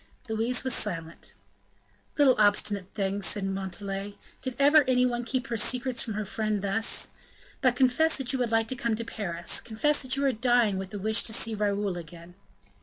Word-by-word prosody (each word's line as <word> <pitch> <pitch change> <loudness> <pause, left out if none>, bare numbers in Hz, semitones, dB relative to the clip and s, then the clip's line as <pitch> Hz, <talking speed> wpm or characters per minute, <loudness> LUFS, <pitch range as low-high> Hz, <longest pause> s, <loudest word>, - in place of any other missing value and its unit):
Louise 225 +3 +1
was 260 -2 +1
silent. 165 -5 -3 0.8
"Little 285 -3 +5
obstinate 205 -2 +2
thing!" 200 0 -2
said 195 +1 0
Montalais; 195 +1 -4 0.2
"did 260 -2 -4
ever 290 +2 +6
any 250 -1 +3
one 240 -1 -1
keep 255 +2 -2
her 235 -3 -3
secrets 250 +3 +1
from 220 -4 -4
her 215 0 -3
friend 215 0 -2
thus? 200 +3 +1 0.5
But, 255 -3 +3
confess 270 +6 +3
that 270 -1 0
you 265 - -1
would 240 -2 -1
like 225 0 +2
to 260 - -2
come 235 -2 -1
to 230 +1 -5
Paris; 175 -7 -1
confess 265 +7 0
that 260 -1 -1
you 280 +1 -1
are 270 - +3
dying 235 -4 +2
with 190 -1 -6
the 205 - -7
wish 220 +3 +2
to 220 - -1
see 225 0 +1
Raoul 205 -3 -1
again." 170 +1 -11
220 Hz, 190 wpm, -27 LUFS, 200-250 Hz, 0.8 s, ever